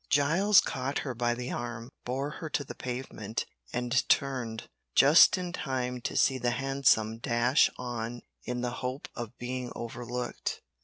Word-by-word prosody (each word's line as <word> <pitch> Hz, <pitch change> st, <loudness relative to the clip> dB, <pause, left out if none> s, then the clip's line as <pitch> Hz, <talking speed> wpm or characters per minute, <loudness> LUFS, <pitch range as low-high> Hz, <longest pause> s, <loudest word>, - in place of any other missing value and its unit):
Giles 170 Hz, +8 st, +5 dB
caught 135 Hz, +2 st, -2 dB
her 130 Hz, -, -2 dB
by 120 Hz, 0 st, 0 dB
the 125 Hz, +1 st, -4 dB
arm, 120 Hz, 0 st, -5 dB
bore 135 Hz, +4 st, -2 dB
her 160 Hz, -, -4 dB
to 145 Hz, -, -1 dB
the -, -, -8 dB
pavement, 120 Hz, -4 st, -4 dB, 0.3 s
and 125 Hz, +1 st, +1 dB
turned, 125 Hz, -5 st, 0 dB, 0.3 s
just 150 Hz, +7 st, +8 dB
in 180 Hz, -1 st, -4 dB
time 125 Hz, -5 st, -2 dB
to -, -, -3 dB
see 130 Hz, -1 st, +3 dB
the 120 Hz, -, +1 dB
hansom 125 Hz, -4 st, +2 dB
dash 120 Hz, +3 st, +3 dB
on 120 Hz, -1 st, -4 dB, 0.2 s
in 125 Hz, 0 st, -3 dB
the 120 Hz, 0 st, -1 dB
hope 130 Hz, +2 st, -4 dB
of 120 Hz, -1 st, -7 dB
being 125 Hz, 0 st, -4 dB
overlooked. 120 Hz, +1 st, -4 dB
125 Hz, 155 wpm, -29 LUFS, 120-135 Hz, 0.3 s, just